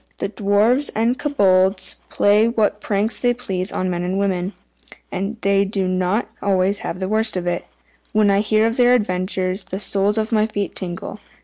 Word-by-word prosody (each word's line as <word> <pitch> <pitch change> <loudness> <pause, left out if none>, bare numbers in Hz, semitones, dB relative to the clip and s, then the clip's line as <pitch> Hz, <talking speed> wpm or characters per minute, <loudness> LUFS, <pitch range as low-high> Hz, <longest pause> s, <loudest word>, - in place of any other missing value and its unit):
The - - -3
Dwarfs 215 +7 +2
and 230 +4 +1
Kobolds 190 -8 +2
play 210 +2 +3
what 225 -3 0
pranks 210 +2 0
they 245 -1 +1
please 190 -6 -4
on 185 - -2
men 175 -1 -2
and 180 +2 -2
women, 190 -1 -1 0.6
and 200 +4 -3
they 200 0 +3
do 195 -1 -1
not 185 +5 0
always 195 0 +1
have 180 - -5
the 190 - -2
worst 220 0 +1
of 180 - -3
it. 175 0 -2 0.5
When 210 -2 +3
I 200 - +3
hear 215 +1 +2
of 230 +1 -1
their 245 0 +5
adventures, 185 -2 -1
the 190 - -5
soles 205 +1 +1
of 220 +1 -1
my 215 -1 +2
feet 205 -2 -3
tingle. 185 +3 -5
200 Hz, 185 wpm, -20 LUFS, 185-220 Hz, 0.6 s, their